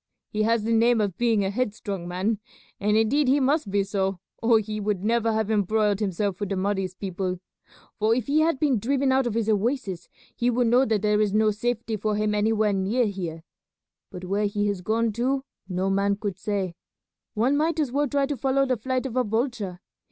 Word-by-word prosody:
He 215 - -2
has 225 0 +2
the 230 +1 0
name 230 +1 +4
of 200 -4 0
being 225 -4 +2
a 190 - -1
headstrong 205 -5 -3
man, 190 +5 -1 0.4
and 210 +1 +2
indeed 260 +6 +2
he 275 +3 +4
must 275 -3 +1
be 200 0 +1
so 195 -1 -1 0.2
or 230 0 +5
he 215 0 -3
would 205 -2 -1
never 230 +1 +2
have 220 -1 0
embroiled 210 0 +2
himself 200 -2 -1
with 205 -2 -3
the 195 - -1
Mahdi's 190 -1 -1
people, 185 -1 -3 0.6
for 220 +2 +3
if 245 -3 -1
he 290 +2 +2
had 315 -3 +2
been 275 -7 +2
driven 270 +4 +1
out 260 -1 +2
of 225 - -3
his 230 -2 0
oasis 210 -4 -1 0.3
he 245 0 +1
would 245 0 +2
know 245 +3 +4
that 220 -3 0
there 210 0 +3
is 210 -1 +1
no 215 0 +4
safety 225 +1 -2
for 210 +1 -1
him 210 0 0
anywhere 210 0 +2
near 200 +6 +1
here; 175 -6 -4 0.7
but 185 -2 -8
where 200 +3 0
he 205 0 -1
has 200 -3 -1
gone 225 +4 +1
to 265 +4 0 0.3
no 185 +1 -1
man 200 +1 +2
could 200 -2 -4
say. 195 -3 -2 0.6
One 245 +6 +2
might 320 +2 +1
as 290 -5 0
well 290 +2 +1
try 280 +1 +1
to 285 0 -3
follow 270 +3 +2
the 255 -2 0
flight 255 +3 -2
of 255 -3 -4
a 255 - +3
vulture. 220 -5 -2
215 Hz, 210 wpm, -25 LUFS, 200-245 Hz, 0.7 s, or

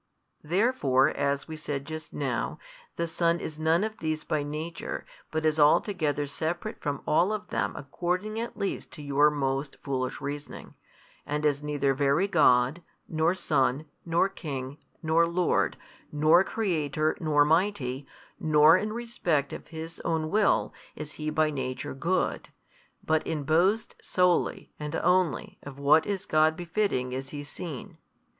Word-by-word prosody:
Therefore 170 - +3
as 140 0 -1
we 160 - -6
said 145 -3 -4
just 155 0 -7
now, 135 -5 -2 0.4
the 170 - -1
Son 170 +1 +1
is 155 -1 -6
none 160 +4 +3
of 220 0 -4
these 155 -1 -2
by 155 - -1
nature, 155 +3 -5 0.2
but 160 0 -2
is 155 0 +2
altogether 150 -1 +3
separate 170 +9 -4
from 145 -2 -3
all 175 +6 +3
of 215 -2 -4
them - - -1
according 180 +9 -3
at 235 +1 -5
least 200 - -3
to 150 - -8
your 145 +1 +4
most 140 -1 -2
foolish 130 -2 -2
reasoning, 145 +1 -7 0.5
and 150 +1 -2
is 145 -1 +2
neither 145 -2 0
Very 140 +7 +2
God, 140 -3 +4 0.3
nor 160 +2 +1
Son, 145 -4 +1 0.2
nor 170 +3 +2
King, 145 -6 -6 0.2
nor 165 +1 +3
Lord, 170 +1 +1 0.3
nor 155 +4 +5
Creator, 155 -8 -1
nor 150 -2 +4
Mighty, 150 -6 0 0.3
nor 155 +1 +6
in 215 +2 -2
respect 180 - -1
of - - -8
His 165 0 -7
own 160 -1 -1
"Will 210 0 +2 0.2
is 150 -1 -6
He 155 0 -4
by 155 0 +2
Nature 130 -3 -4
Good: 170 +7 -1 0.6
but 160 0 +2
in 155 -3 -2
boasts 180 +9 +2
solely 180 -1 +1
and 150 +1 -4
only 180 -8 +1
of 140 -1 -10
what 145 +3 +4
is 195 -2 -2
God 155 0 +3
befitting 175 -8 -1
is 130 +1 -4
He 145 0 -6
seen. 145 -1 -7
155 Hz, 150 wpm, -28 LUFS, 145-175 Hz, 0.6 s, nor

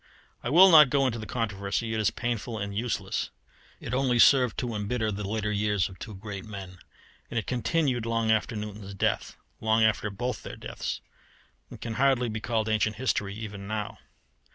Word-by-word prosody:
I - - -3
will 180 +6 +8
not 150 -4 +9
go 135 +1 +2
into 115 -3 -1
the 110 - -7
controversy: 110 0 -2
it 110 - -1
is 105 - +3
painful 120 -1 -3
and 100 -1 -4
useless. 115 +1 -2 0.5
It 115 - -6
only 130 -1 +2
served 125 -1 +5
to 120 -2 -2
embitter 110 +1 -1
the 105 +1 -4
later 105 0 -1
years 105 -2 +1
of 95 -2 -13
two 110 - -7
great 100 0 -7
men, 95 -4 -9 0.5
and 120 - -4
it 110 - -1
continued 125 -2 0
long 115 -1 +1
after 110 +1 +1
Newton's 105 -2 -6
death - - -1 0.2
long 110 0 +3
after 105 -1 +2
both 120 +6 -3
their - - -8
deaths. - - -5 0.7
It - - -11
can 115 - -4
hardly 130 -3 +3
be 110 0 -3
called 110 -1 0
ancient 110 0 +1
history 105 -4 -1
even 105 -3 -7
now. 105 0 -4
110 Hz, 185 wpm, -28 LUFS, 105-120 Hz, 0.7 s, not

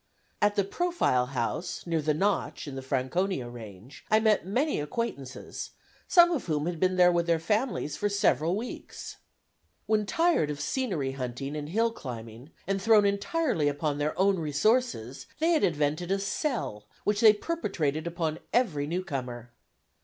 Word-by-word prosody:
At 205 0 +3
the 200 - +3
Profile 200 - +1
House, 125 +6 -3
near 165 -2 0
the 150 0 +1
Notch, 200 -2 -1
in 140 - -6
the 135 - -5
Franconia 130 +3 -1
range, 115 +1 -11
I 215 - +5
met 215 -4 +2
many 265 - +1
acquaintances, 145 - -4 0.4
some 345 -1 +6
of 315 -7 -1
whom 150 -2 0
had 170 -1 -3
been 185 +1 +2
there 180 -1 +6
with 170 0 +1
their 170 -1 +3
families 210 - -1
for 205 - 0
several 180 - +2
weeks. 230 +4 -7 0.7
When 215 -1 +1
tired 330 - +2
of 145 -1 -4
scenery 165 - -1
hunting 135 +2 -5
and 150 0 -5
hill 225 +6 +2
climbing, 120 - -8 0.2
and 195 +1 -1
thrown 215 0 +5
entirely 200 - +1
upon 145 0 -1
their 150 +1 -1
own 195 -1 +3
resources, 155 - 0
they 325 +2 +2
had 320 - +3
invented 155 +2 0
a 195 - +3
"sell" 195 - -2 0.2
which 210 0 +1
they 220 -2 +9
perpetrated 185 - -2
upon 165 -2 -2
every 160 - +1
new 180 +4 -2
comer. 125 -7 -5
170 Hz, 160 wpm, -28 LUFS, 140-210 Hz, 0.7 s, they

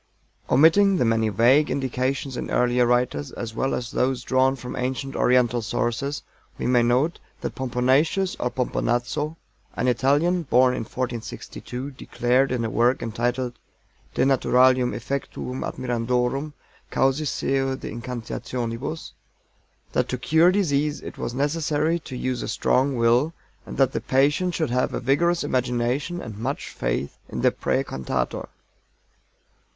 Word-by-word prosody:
Omitting 185 +8 +5
the 125 - +2
many 115 -1 +2
vague 125 +8 +4
indications 130 0 -1
in - - -4
earlier 125 0 +2
writers, 125 +3 0
as 115 -2 -5
well 135 +3 0
as 120 -1 -4
those 130 -1 0
drawn 130 +1 +2
from 125 -1 -7
ancient 130 +2 -3
Oriental 125 -1 +3
sources, 120 +6 -2 0.3
we - - -4
may 125 -1 +4
note 125 +8 +2 0.2
that - - -3
POMPONATIUS 130 +9 +1
or 125 - 0
POMPONAZZO, 125 +4 -1 0.4
an 125 - 0
Italian, 145 +8 +2
born 130 -4 +4
in - - -2
1462, 125 +2 -5
declared 130 0 +1
in 120 -2 0
a - - -1
work 120 +2 +2
entitled 120 +2 -1 0.6
De - - +3
naturalium 130 -1 +4
effectuum 130 -1 -4
admirandorum 125 +4 -1 0.4
Causis 135 +2 +1
seu 135 -1 0
de - - -7
Incantationibus, 120 +3 -5 0.8
that - - 0
to 125 - -1
cure 160 +7 +4
disease 150 -6 0
it - - -9
was 120 - -3
necessary 150 +3 0
to 130 -5 -8
use 130 0 -2
a - - -4
strong 135 +1 +1
will, 120 +7 +2 0.3
and - - -7
that 135 -2 +4
the - - -3
patient 145 +7 +2
should 155 -6 -1
have 125 +1 0
a - - -1
vigorous 170 +7 +2
imagination 130 +5 -1
and 110 - -8
much 130 +5 -3
faith - - -3
in - - -4
the - - +4
praê 135 +1 -1
cantator. 65 - -3
130 Hz, 140 wpm, -24 LUFS, 120-140 Hz, 0.8 s, Omitting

